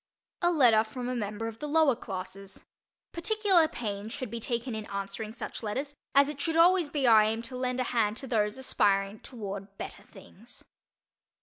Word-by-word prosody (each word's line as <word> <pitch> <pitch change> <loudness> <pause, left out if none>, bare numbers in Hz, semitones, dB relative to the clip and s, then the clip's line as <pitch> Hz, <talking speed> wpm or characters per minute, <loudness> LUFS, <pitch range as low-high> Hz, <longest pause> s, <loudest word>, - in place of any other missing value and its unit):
A 345 0 +3
Letter 240 -9 +5
from 245 +3 -6
a 250 - -1
Member 215 0 -3
of 225 0 -7
the 300 - -4
Lower 300 -3 +4
Classes. 195 -2 -7 0.5
Particular 380 -2 +3
pains 210 -6 -5
should 255 -2 -5
be 235 - -4
taken 235 +1 -2
in 220 -1 -5
answering 200 +2 -4
such 230 +1 -6
letters 265 +7 -3 0.2
as 280 0 +7
it 290 -1 -5
should 325 -1 0
always 345 -1 +5
be 285 -2 -1
our 225 -3 +8
aim 220 +2 0
to 255 +2 -6
lend 255 0 -1
a - - +2
hand 225 -3 0
to 270 - -4
those 215 -2 0
aspiring 200 -5 +1
toward 200 -4 -7
better - - -6
things. 230 +5 -12
235 Hz, 185 wpm, -29 LUFS, 210-280 Hz, 0.5 s, our